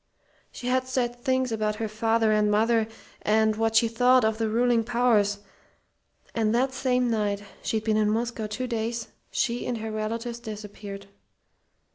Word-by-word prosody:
"She - - -9
had 255 +1 +1
said 245 -2 -1
things 260 0 0
about 215 -1 0
her 220 0 -3
father 225 +1 +1
and 210 -1 +3
mother, 220 +1 +3 0.3
and 220 0 +3
what 225 0 0
she 230 +1 +5
thought 245 +1 +4
of 220 0 0
the 225 -1 0
ruling 235 +1 +2
powers, 220 -4 +2 0.9
and 225 -1 +1
that 260 +2 +1
same 250 -2 +1
night 205 -2 0 0.2
she'd 220 -1 -1
been 220 -1 +1
in 210 -1 +3
Moscow 225 0 -1
two 235 +5 -3
days 230 -1 -3 0.2
she 240 0 -1
and 245 - -1
her 220 0 -5
relatives 230 +2 -3
disappeared. 205 -3 -8
225 Hz, 160 wpm, -26 LUFS, 215-240 Hz, 0.9 s, she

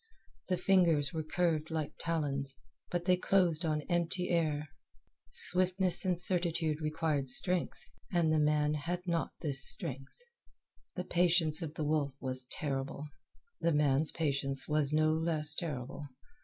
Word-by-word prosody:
The 185 - -1
fingers 170 -6 +2
were 160 - -3
curved 160 0 -2
like 160 -2 -4
talons, 140 -5 -3 0.3
but 175 -1 -3
they 180 0 +3
closed 180 -3 +2
on 155 -2 -2
empty 175 +1 -2
air. 155 -3 -1 0.6
Swiftness 185 +1 +2
and 180 -2 0
certitude 170 -4 0
require 155 -2 -1
strength, 180 +7 +4 0.3
and 170 -3 +1
the 155 - +2
man 150 0 +1
had 175 +4 -4
not 170 -2 -2
this 140 -4 +4
strength. 135 +1 +2 0.8
The 180 - -4
patience 175 -2 +1
of 160 -2 -6
the 155 - -4
wolf 145 -3 -1
was 130 -1 -2
terrible. 140 0 -5 0.5
The 170 - 0
man's 150 0 +1
patience 140 -3 -1
was 150 -2 0
no 155 +1 +2
less 160 -2 +4
terrible. 145 -3 -6
155 Hz, 140 wpm, -31 LUFS, 145-175 Hz, 0.8 s, strength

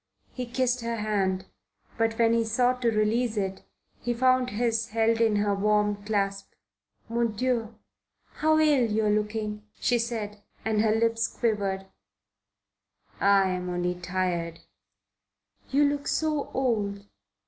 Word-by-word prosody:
He 250 -1 -4
kissed 250 0 0
her 230 0 -2
hand, 195 -4 -1 0.5
but 225 -1 0
when 230 -1 +4
he 230 0 +3
sought 245 +3 +1
to 235 - +3
release 220 +1 +1
it 190 -1 -2 0.4
he 240 0 -1
found 255 +1 +3
his 225 0 0
held 225 0 +1
in 220 -2 +3
her 205 0 +1
warm 210 0 +1
clasp. 200 -2 -1 0.5
"Mon 230 -1 0
Dieu! 230 -1 -1 0.6
How 315 0 +3
ill 290 -7 +4
you 215 +1 +1
are 210 - +3
looking!" 210 0 -2 0.2
she 240 -1 +2
said, 215 -3 -4 0.2
and 220 -1 +2
her 220 0 +3
lips 230 0 +1
quivered. 200 -5 -1 1.3
"I'm 190 -2 +2
only 175 0 -1
tired." 175 -2 -2 1.1
"You 285 +2 +4
look 285 0 -2
so 305 -2 0
old. 210 -6 -1
220 Hz, 135 wpm, -27 LUFS, 205-240 Hz, 1.3 s, when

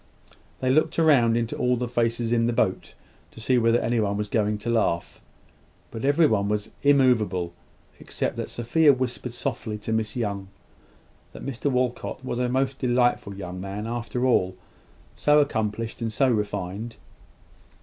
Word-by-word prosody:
They 130 0 +2
looked 155 +4 +2
round 130 -8 +4
into 115 -1 -2
all 125 0 +1
the 125 +1 -2
faces 115 -1 0
in 115 -1 +2
their 120 - -1
boat 95 - -1 0.3
to - - -14
see 125 +3 +2
whether 115 +1 +3
anyone 110 -4 0
was 105 0 -3
going 105 -1 +1
to 105 +3 -5
laugh: 110 -7 0 0.7
but 115 - -6
everybody 140 -8 +3
was 105 0 -2
immoveable, 115 -11 +3 0.5
except - - -3
that - - -4
Sophia 145 +6 +3
whispered 125 -1 -3
softly 110 -2 -3
to 110 +1 -4
Miss 110 -1 -1
Young, 100 -5 -3 0.9
that - - -9
Mr 140 +1 -2
Walcot 125 0 -2
was 120 - -3
a 125 -1 0
most 130 +1 0
delightful 120 -5 +1
young 90 -1 -6
man, 100 +2 -5
after 120 +2 -2
all 95 -7 +2 0.6
so 150 0 +3
accomplished 115 -5 -1
and 115 -1 -1
so 130 +5 +2
refined! 105 0 -2
115 Hz, 155 wpm, -25 LUFS, 105-125 Hz, 0.9 s, round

